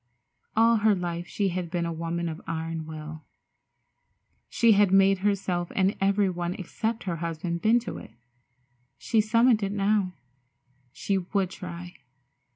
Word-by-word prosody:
All 230 +1 +5
her 215 -1 +3
life 175 -1 -4
she 200 -2 -1
had 180 -1 -3
been 170 -1 -1
a 170 - -2
woman 170 +1 -3
of 160 -1 -5
iron 160 -1 -4
will. 155 0 -8 1.3
She 230 -1 +4
had 205 -2 +4
made 195 0 +5
herself 190 -3 -1
and 190 +1 +2
every 200 +1 +3
one 175 0 -3
except 220 +5 -3
her 175 -3 -3
husband 170 +1 -3
bend 230 +2 +3
to - - -6
it. - - -11 0.9
She 225 -3 +2
summoned 230 +1 +3
it 200 -1 -1
now. 200 -2 +1 0.8
She 195 +8 -1
would 190 0 -1
try. 175 -2 -8
185 Hz, 150 wpm, -27 LUFS, 170-205 Hz, 1.3 s, All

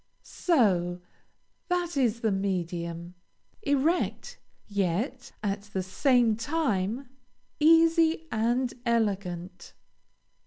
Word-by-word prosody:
So! 185 - +1 0.7
that 355 -2 -1
is 235 -4 +1
the 220 - +1
medium. 175 -3 -3 0.5
Erect, 310 0 0 0.3
yet, 205 - -2
at 200 -1 -1
the 190 - -1
same 240 +3 +3
time, 240 - -1 0.5
easy 325 +1 +4
and 240 +3 0
elegant. 200 -7 -2
225 Hz, 80 wpm, -28 LUFS, 190-285 Hz, 0.7 s, easy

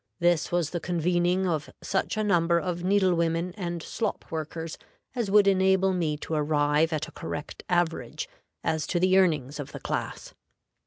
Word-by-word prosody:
This 175 -2 +2
was 175 -3 0
the 175 - -2
convening 175 +2 +1
of 155 -4 -1
such 195 +2 -1
a 215 - +1
number 170 -4 +3
of 175 -1 -3
needle 190 -1 +3
women 170 +1 0
and 175 -4 -4
slop 230 - -3
workers 160 +1 -4 0.4
as 235 -5 -1
would 205 0 +6
enable 190 0 +4
me 160 -5 0
to - - -4
arrive 150 +1 +2
at 155 0 -1
a - - -12
correct 145 -1 -6
average 175 - 0 0.4
as 160 -1 0
to 175 - 0
the 185 +1 +5
earnings 150 -6 +1
of 145 - -6
the - - -6
class. - - -4
175 Hz, 170 wpm, -27 LUFS, 160-185 Hz, 0.4 s, would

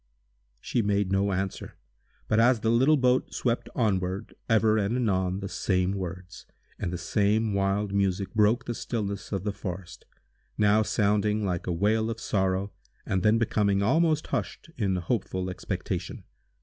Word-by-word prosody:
She 120 - -1
made 100 -2 0
no 100 +1 +2
answer, 95 0 -4 0.5
but, 110 - +2
as 120 0 +4
the 110 - +2
little 130 +6 +4
boat 125 -1 +1
swept 120 -1 -1
onward, 95 -2 -1 0.2
ever 110 -1 +4
and 105 +3 0
anon 95 -5 0
the 100 - -4
same 95 -2 0
words, 90 -2 -6 0.3
and 85 - -2
the 90 - -3
same 105 +3 +1
wild 100 +1 0
music 100 0 0
broke 110 +3 +3
the 120 - -2
stillness 100 -4 -4
of 95 -3 -2
the 105 -1 -2
forest, 90 -3 -7 0.5
now 105 +1 +4
sounding 105 0 +1
like 90 -2 -2
a - - 0
wail 110 +6 +1
of 115 0 -4
sorrow, 95 -1 0 0.3
and 95 -1 0
then 110 +3 +4
becoming 100 -3 +1
almost 155 +6 +2
hushed 165 - -4
in 100 -5 0
hopeful 95 0 -2
expectation. - - -4
100 Hz, 155 wpm, -27 LUFS, 95-110 Hz, 0.5 s, as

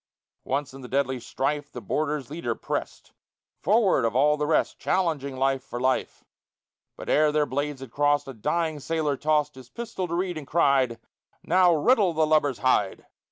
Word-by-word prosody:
Once 135 0 -2
in 135 - -10
the 125 - -8
deadly 130 -1 0
strife 145 +4 -3
The - - -7
boarder's 150 -3 -2
leader 150 -8 -3
pressed - - -5 0.5
Forward 200 - +3
of 115 0 0
all 150 +3 +4
the 150 0 -2
rest 155 - +1
Challenging 150 -7 -1
life 135 0 +1
for 120 -3 -6
life; 130 +1 -1 0.7
But - - -9
ere 150 0 +3
their 150 0 +2
blades 145 0 -3
had 130 -4 -9
crossed 145 +1 +1
A 135 - -6
dying 160 +7 -1
sailor 155 -1 -1
tossed 150 +1 +1
His 130 -2 -14
pistol 220 - -5
to 170 - -3
Reid, 175 -2 -2
and 140 - -11
cried, 135 -7 +2 0.4
"Now 180 0 +4
riddle 200 - +3
the 155 0 +2
lubber's 150 -4 +2
hide!" 105 -6 +1
145 Hz, 175 wpm, -26 LUFS, 135-160 Hz, 0.7 s, all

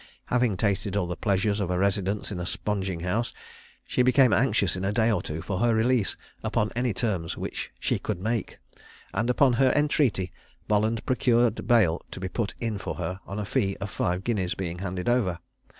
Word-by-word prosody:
Having 120 -5 +2
tasted 100 -1 0
all 95 - +1
the 90 0 -3
pleasures 100 +1 +1
of 100 -3 -1
a 90 - 0
residence 100 +2 0
in 95 - -4
a 90 - -3
sponging 95 -5 -2
house, 105 +7 -1 0.5
she - - +1
became 125 -1 +5
anxious 105 -4 +2
in 90 - -4
a 95 - +1
day 110 +1 +3
or 100 - +1
two 80 +1 -5
for 95 -2 -2
her 120 0 +3
release 115 -1 +2 0.3
upon 105 - 0
any 120 0 +1
terms 95 -6 -2
which - - -4
she - - 0
could - - -3
make; 110 +3 -2 0.6
and, 115 +2 0
upon 125 +1 +4
her 130 +2 +4
entreaty, 140 - +2 0.4
Bolland 110 +2 +1
procured 120 -3 +2
bail 105 -9 +4
to - - -8
be 95 - -3
put 110 +1 -2
in 110 -3 -2
for - - -4
her 90 +2 -4
on 100 - -5
a 105 - -2
fee 100 -3 0
of 100 0 -5
five 90 +2 -1
guineas 95 -6 0
being 90 -2 -4
handed 90 0 -4
over. 115 -8 +2
105 Hz, 195 wpm, -27 LUFS, 95-120 Hz, 0.6 s, became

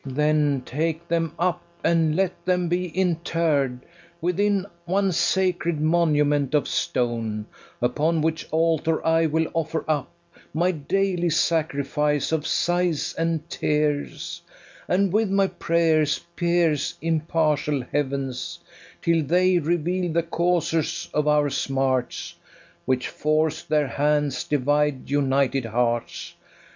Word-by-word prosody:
FERNEZE. 130 -2 -7
Then 150 -2 +2
take 160 +4 -2
them 165 -1 0
up, 175 0 0 0.2
and 165 -2 +2
let 185 0 -1
them 180 -1 +1
be 180 +1 0
interr'd 165 -7 0 0.4
Within 195 +3 +1 0.2
one 195 +2 +1
sacred 175 -2 +1
monument 150 -3 +2
of 145 - +2
stone; 115 -3 -1 0.4
Upon 155 +6 +1
which 160 0 -1
altar 160 0 +1
I 165 0 +3
will 160 +1 +1
offer 160 0 -2
up 150 -3 -1 0.4
My 175 +3 +2
daily 180 +2 0
sacrifice 150 -2 0
of 160 -1 0
sighs 175 -3 0
and 165 -1 -1
tears, 150 +3 -1 0.5
And 195 0 +1
with 215 -1 +2
my 195 0 +3
prayers 160 -4 +1 0.2
pierce 170 -4 +1
impartial 155 -3 0
heavens, 135 -3 -2 0.5
Till 165 -1 +2
they 180 +4 +3
[reveal] 175 +3 0
the 170 +1 +1
causers 165 -1 0
of 150 0 +1
our 150 -1 +3
smarts, 130 -2 -1 0.5
Which 130 -1 0
forc'd 155 0 -1
their 150 -2 +2
hands 145 +2 0
divide 145 -1 0
united 135 -2 +1
hearts. 120 +1 -2
160 Hz, 115 wpm, -24 LUFS, 145-170 Hz, 0.5 s, I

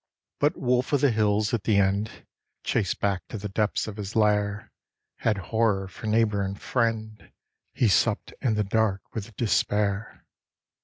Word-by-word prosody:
But 150 +4 +2
wolf 125 +2 +1
of 140 - +3
the 140 -3 +4
hills 105 0 +1
at 115 -4 0
the 105 -3 +3
end 100 +3 0 0.4
chased 100 -6 0
back 100 -2 0
to - - -6
the 105 0 -5
depths 105 +2 0
of 110 -1 -7
his 105 0 -6
lair 105 -1 +1 0.5
Had 110 -2 +1 0.2
horror 105 -4 +2
for 100 +4 -8
neighbour 105 -2 +2
and 100 0 -3
friend 110 -3 -2 0.4
he 120 - +2
supped 105 +2 +2
in 115 -5 +1
the 105 - +1
dark 100 -1 +1
with 110 0 -6
despair. 105 -2 0
105 Hz, 160 wpm, -26 LUFS, 100-115 Hz, 0.5 s, the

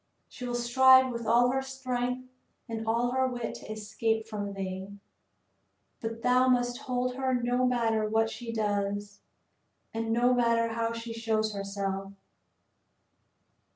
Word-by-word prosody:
She 250 - -8
will 245 - -2
strive 260 +2 +6
with 235 -1 -5
all 240 +2 +5
her 265 +1 0
strength 255 -1 -3 0.4
and 225 -1 -5
all 235 +2 +1
her 260 0 +2
wit 240 -2 -4
to - - -9
escape 220 +1 -1
from 205 -2 -4
thee; 190 +1 -5 1.0
but 225 0 -5
thou 250 +1 +4
must 245 0 +2
hold 250 -2 -1
her 260 -1 +1
no 245 +1 +1
matter 225 -3 +1
what 225 +1 +2
she 235 -1 -6
does, 205 -2 -2 0.7
and 225 0 -2
no 240 +2 +3
matter 230 -1 +2
how 230 0 -1
she 230 0 -5
shows 220 -1 0
herself. 195 -1 -4
230 Hz, 140 wpm, -29 LUFS, 215-250 Hz, 1.0 s, strive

